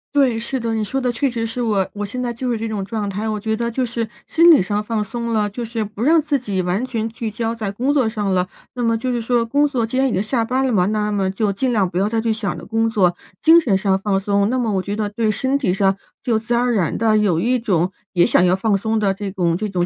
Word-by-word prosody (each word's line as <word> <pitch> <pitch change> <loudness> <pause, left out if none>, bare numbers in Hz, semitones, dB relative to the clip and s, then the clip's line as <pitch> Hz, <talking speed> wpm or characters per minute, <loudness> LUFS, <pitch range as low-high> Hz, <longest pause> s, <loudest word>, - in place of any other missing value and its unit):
对， 260 -5 +3
是 245 +3 -3
的， 230 -1 -2
你 220 -1 0
说 265 +6 -2
的 250 -2 0
确 265 +4 0
实 230 -2 -3
是 230 +2 -4
我 210 -5 +1
我 205 - -4
现 250 +5 -5
在 240 -1 -2
就 250 +2 -4
是 235 - 0
这 225 +1 -3
种 210 -3 -3
状 210 +1 -3
态， 205 +3 -3
我 215 -1 -2
觉 220 +1 -1
得 235 +1 -2
就 250 +2 -1
是 230 -1 -3 0.2
心 335 +1 +5
理 305 - +7
上 205 +2 -1
放 215 0 -1
松 235 +2 -4
了， 215 -2 +1
就 235 +4 -6
是 230 -1 -3
不 210 +1 -8
让 320 +6 +5
自 295 -2 0
己 200 -6 -2
完 180 +6 -1
全 230 -4 -2
聚 225 0 -5
焦 225 +1 -2
在 215 -4 -4
工 255 +8 0
作 260 -6 +2
上 210 -3 -1
了。 180 0 +1 0.3
那 250 - -5
么 230 -1 +2
就 255 +3 -2
是 240 -1 -1
说 235 0 +1
工 285 +5 +2
作 250 -5 -1
既 230 +3 -4
然 270 0 +3
已 - - -2
经 190 - 0
下 230 +2 0
班 255 +3 0
了 260 - 0
嘛， 180 -4 +3
那 210 0 0
么 195 -2 0
就 200 +2 0
尽 255 +6 0
量 205 -5 +2
不 175 - -5
要 200 +2 +1
再 225 0 0
去 225 0 +1
想 215 -2 -3
着 - - -9
工 225 +1 0
作。 185 -6 +2 0.3
精 330 +1 +7
神 210 -11 +2
上 190 0 +1
放 195 -1 0
松， 200 +1 +1
那 255 - 0
么 235 -4 0
我 190 - +1
觉 200 +2 -4
得 210 -1 -2
对 220 +1 -1
身 260 +6 0
体 250 -11 0
上 195 0 +2 0.3
就 230 -4 +1
自 230 +2 -3
然 235 +1 +2
而 245 -1 +1
然 185 -7 0
地 220 -1 +3
有 200 -6 +2
一 250 +6 +1
种， 185 -5 0 0.2
也 175 -2 +4
想 - - +3
要 180 +1 +3
放 200 +2 +1
松 220 +3 -1
的 200 -3 +1
这 200 +1 -5
种 175 -3 0
这 210 +4 -3
种 180 -2 0
220 Hz, 320 characters per minute, -20 LUFS, 200-240 Hz, 0.3 s, 理